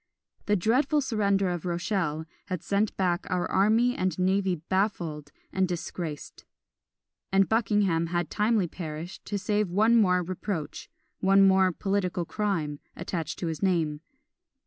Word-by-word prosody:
The 210 - +3
dreadful 255 - +2
surrender 200 -7 +1
of 175 -2 -4
Rochelle 170 -3 -1 0.2
had 185 -3 -4
sent 200 +1 0
back 180 -1 0
our 180 -1 0
army 225 +5 +3
and 185 -3 -1
navy 190 0 +1
baffled 165 -4 -2 0.2
and 190 0 +2
disgraced; 170 -3 -5 0.9
and 195 0 +4
Buckingham 200 -7 +2
had 175 -1 -2
timely 210 -3 +2
perished, 160 +1 -7
to 205 - -2
save 205 0 0
one 215 +6 +4
more 180 -5 +4
reproach, 175 -3 -5 0.3
one 195 +1 +5
more 190 -1 +4
political 185 -2 -1
crime, 165 -8 -2 0.2
attached 165 -4 -4
to - - -4
his 160 -2 -3
name. 160 -6 +1
185 Hz, 135 wpm, -27 LUFS, 170-205 Hz, 0.9 s, one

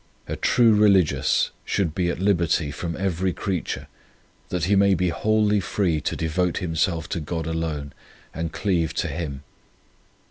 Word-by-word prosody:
A - - -3
true 115 -3 +4
religious 100 -6 +3
should 90 -6 -1
be 90 0 0
at - - -2
liberty 85 -5 +1
from 85 +2 -4
every 95 -1 -1
creature 95 -5 -3 0.6
that 90 -2 -2
he 100 +4 +3
may 100 0 +4
be 90 +1 +1
wholly 105 +3 +2
free 90 -5 0
to - - -2
devote 85 +2 0
him 85 -3 -3
self 80 -1 0
to - - -2
God 80 +1 -4
alone 80 -3 -3 0.4
and 80 0 -3
cleave 85 -5 0
to - - -1
Him. 70 -5 -5
85 Hz, 155 wpm, -24 LUFS, 80-95 Hz, 0.6 s, true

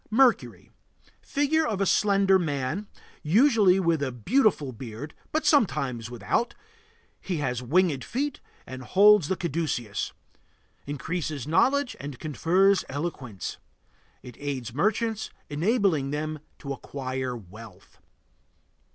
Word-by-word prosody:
MERCURY. 245 +2 +2 0.5
Figure 290 +3 +1
of 210 -3 -2
a 195 - +2
slender 195 -1 +4
man, 155 +4 -2 0.3
usually 200 - +4
with 165 -4 +1
a 135 -2 -1
beautiful 165 - +1
beard, 120 +4 -8 0.2
but 310 0 -1
sometimes 140 - +2
without. 125 - -1 0.6
He 180 -3 -3
has 125 -4 -2
winged 145 0 +2
feet 280 - -3 0.3
and 130 0 -8
holds 200 +4 +5
the 190 - 0
caduceus. 145 - -2 0.8
Increases 150 -1 -3
knowledge 260 - +2
and 140 -2 -7
confers 180 +7 +2
eloquence. 135 - -5 0.7
It 125 - -11
aids 130 -5 -4
merchants, 220 - 0 0.2
enabling 170 - +1
them 155 +1 -3 0.2
to 140 -1 -5
acquire 130 -2 -4
wealth. 110 +2 -14
155 Hz, 110 wpm, -26 LUFS, 130-200 Hz, 0.8 s, holds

